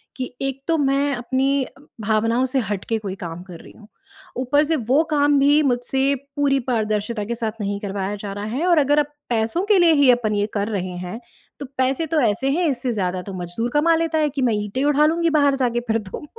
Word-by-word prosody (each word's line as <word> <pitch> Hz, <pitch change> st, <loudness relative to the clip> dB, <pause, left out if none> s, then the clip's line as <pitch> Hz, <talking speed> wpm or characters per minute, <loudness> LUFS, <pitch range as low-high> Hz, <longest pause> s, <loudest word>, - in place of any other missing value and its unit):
कि 255 Hz, -1 st, -5 dB
एक 270 Hz, 0 st, -3 dB
तो 330 Hz, -, +2 dB
मैं 280 Hz, 0 st, +1 dB
अपनी 265 Hz, +3 st, 0 dB
अ, 270 Hz, -, -17 dB, 0.2 s
भावनाओं 225 Hz, +4 st, +1 dB
से -, -, +4 dB
हट 195 Hz, -2 st, -3 dB
के 225 Hz, -, +2 dB
कोई 195 Hz, -3 st, -5 dB
काम 165 Hz, +1 st, -6 dB
कर 170 Hz, -2 st, -9 dB
रही -, -, -14 dB
हूँ। 215 Hz, -, -17 dB, 0.5 s
ऊपर 270 Hz, +4 st, +2 dB
से 320 Hz, +2 st, +1 dB
वो 265 Hz, +3 st, +2 dB
काम 290 Hz, -1 st, +3 dB
भी 290 Hz, +2 st, +4 dB
मुझसे 265 Hz, +1 st, +1 dB, 0.2 s
पूरी 280 Hz, -2 st, +2 dB
पारदर्शिता 215 Hz, -1 st, -1 dB
के 235 Hz, +3 st, -3 dB
साथ 225 Hz, -2 st, -2 dB
नहीं 200 Hz, 0 st, -2 dB
करवाया 200 Hz, 0 st, -3 dB
जा 200 Hz, -1 st, -4 dB
रहा 205 Hz, +1 st, -5 dB
है 310 Hz, +6 st, -1 dB
और 345 Hz, -2 st, +4 dB
अगर 290 Hz, +1 st, +3 dB
अब 295 Hz, -, +2 dB, 0.2 s
पैसों 230 Hz, +9 st, 0 dB
के 415 Hz, -1 st, +4 dB
लिए 340 Hz, -2 st, +5 dB
ही 285 Hz, -3 st, +4 dB
अपन 225 Hz, -4 st, 0 dB
ये 205 Hz, 0 st, 0 dB
कर 205 Hz, -1 st, -1 dB
रहे 185 Hz, -4 st, -3 dB
हैं, 180 Hz, +6 st, -6 dB, 0.4 s
तो 285 Hz, -, -5 dB
पैसे 260 Hz, +5 st, +1 dB
तो 315 Hz, +1 st, +1 dB
ऐसे 235 Hz, +3 st, +1 dB
हैं, 340 Hz, +4 st, +1 dB
इससे 250 Hz, -2 st, -2 dB
ज़्यादा 185 Hz, -3 st, -2 dB
तो -, -, -6 dB
मज़दूर 180 Hz, +6 st, -4 dB
कमा 325 Hz, +3 st, +4 dB
लेता 325 Hz, -1 st, 0 dB
है 305 Hz, -1 st, +2 dB
कि 280 Hz, 0 st, -4 dB
मैं 245 Hz, -3 st, +2 dB
ईंटें 210 Hz, +5 st, -2 dB
उठा 295 Hz, +1 st, +4 dB
लूँगी 335 Hz, +2 st, +2 dB
बाहर 285 Hz, -1 st, +3 dB
जाके 240 Hz, -3 st, 0 dB
फिर 225 Hz, 0 st, +2 dB
तो। 205 Hz, +7 st, -8 dB
255 Hz, 230 wpm, -21 LUFS, 210-285 Hz, 0.5 s, लिए